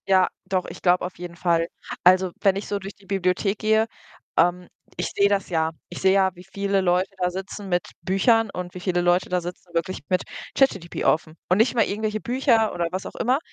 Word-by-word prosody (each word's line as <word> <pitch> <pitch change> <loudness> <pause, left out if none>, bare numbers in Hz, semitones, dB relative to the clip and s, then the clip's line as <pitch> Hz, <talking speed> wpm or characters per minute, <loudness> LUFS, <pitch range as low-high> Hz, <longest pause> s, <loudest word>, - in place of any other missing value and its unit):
Ja, 190 -1 +5 0.2
doch, 185 -1 -1
ich - - -10
glaube 180 0 +3
auf 180 - -7
jeden 175 0 -8
Fall. 170 -1 +1 0.4
Also, 185 0 +5
wenn 195 -2 +4
ich 195 - -4
so 205 - -2
durch 195 +1 -8
die 200 - -22
Bibliothek 195 +1 0
gehe 220 +1 +3 0.5
ähm, 175 +1 +3 0.3
ich 175 - -1
sehe 200 0 +4
das 200 -1 0
ja. 160 -2 +1 0.2
Ich 175 - -7
sehe 190 0 +5
ja, 190 -1 +4
wie 180 - -12
viele 195 +1 -1
Leute 180 +1 +2
da 180 -1 +1
sitzen 195 +2 -6
mit 175 -1 0
Büchern 220 +5 +3
und 180 -1 -6
wie - - -5
viele 175 0 +1
Leute 175 +1 +2
da 180 0 +1
sitzen 175 0 -9
wirklich 170 +2 -1
mit 185 -1 +1 0.3
ChatGPT 195 -11 +1
offen 155 0 +1
und 180 - +4
nicht 225 +4 +3
mal 225 - +4
irgendwelche 215 +1 -2
Bücher 240 -3 +2
oder 170 -1 -1
was 185 +1 -4
auch - - -8
immer. 255 +4 +1
185 Hz, 215 wpm, -24 LUFS, 175-200 Hz, 0.5 s, Ja